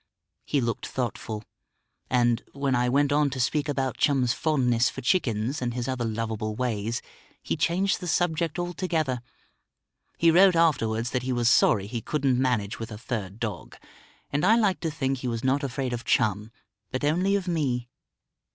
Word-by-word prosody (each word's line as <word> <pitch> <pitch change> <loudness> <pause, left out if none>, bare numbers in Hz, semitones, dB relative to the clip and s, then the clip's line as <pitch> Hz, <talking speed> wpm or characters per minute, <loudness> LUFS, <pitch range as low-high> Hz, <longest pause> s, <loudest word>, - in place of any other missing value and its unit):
He 145 - +1
looked 115 -1 -2
thoughtful; 115 -3 -4 0.7
and, 120 -2 +2
when 140 -1 -1
I 125 0 +2
went 140 +2 +2
on 145 0 +3
to 130 -1 -5
speak 145 +4 0
about 135 -3 -1
Chum's 130 -5 +2
fondness 125 -7 +2
for - - -8
chickens, 125 - 0
and 120 -1 -2
his 120 0 -3
other 130 -2 -2
lovable 110 -1 -3
ways, 115 -2 -2 0.4
he - - -1
changed 190 +3 +1
the 180 - -6
subject 165 -1 0
altogether. 170 -7 -1 1.0
He 165 0 +5
wrote 185 +2 +6
afterwards 120 -8 +2
that 125 - 0
he 130 +1 -3
was 120 -1 +2
sorry 100 -2 +4
he 115 +2 -4
couldn't 135 -3 0
manage 115 -6 0
with 115 0 -6
a 105 - -6
third 105 -3 -5
dog. 115 -3 -5 0.6
And 145 +1 0
I 215 +5 +6
like 205 -5 +2
to 165 - -2
think 135 -3 -2
he 125 - -4
was 115 -1 -3
not 135 +2 +1
afraid 130 -1 -2
of 120 -1 -4
Chum 105 -1 +1 0.4
but 130 - -4
only 180 +7 +2
of 195 -2 -2
me. 135 -8 -1
130 Hz, 175 wpm, -26 LUFS, 115-150 Hz, 1.0 s, wrote